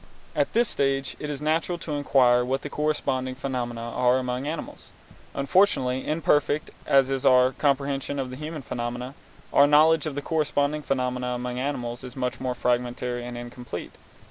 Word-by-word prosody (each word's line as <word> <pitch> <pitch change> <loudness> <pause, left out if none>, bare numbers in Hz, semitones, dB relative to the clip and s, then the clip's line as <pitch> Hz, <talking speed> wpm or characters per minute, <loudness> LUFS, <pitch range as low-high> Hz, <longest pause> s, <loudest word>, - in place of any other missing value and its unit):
At - - 0
this 235 0 +3
stage 135 -4 -1
it 150 - -4
is 145 0 -5
natural 165 +3 0
to 165 - -7
inquire 130 -4 +4
what 130 +2 -2
the 145 - -6
corresponding 135 -4 -1
phenomena 125 -3 -3
are 125 +2 +2
among 125 +1 -2
animals. 155 +1 -6 0.5
Unfortunately, 140 -4 +2
imperfect 150 -1 +1 0.2
as 135 -1 +4
is 135 -1 -1
our 130 0 +5
comprehension 140 0 0
of 130 -2 -3
the - - -6
human 155 +1 -6
phenomena, 120 +2 -4 0.4
our 140 - +7
knowledge 155 +2 +5
of 145 - -4
the 145 - -3
corresponding 150 -1 0
phenomena 125 -3 -1
among 125 0 -4
animals 125 -3 -3
is 125 -1 -9
much 125 -2 -2
more 130 -1 -2
fragmentary 125 0 -1
and 120 0 -6
incomplete. 120 -6 -7
135 Hz, 165 wpm, -26 LUFS, 125-145 Hz, 0.5 s, our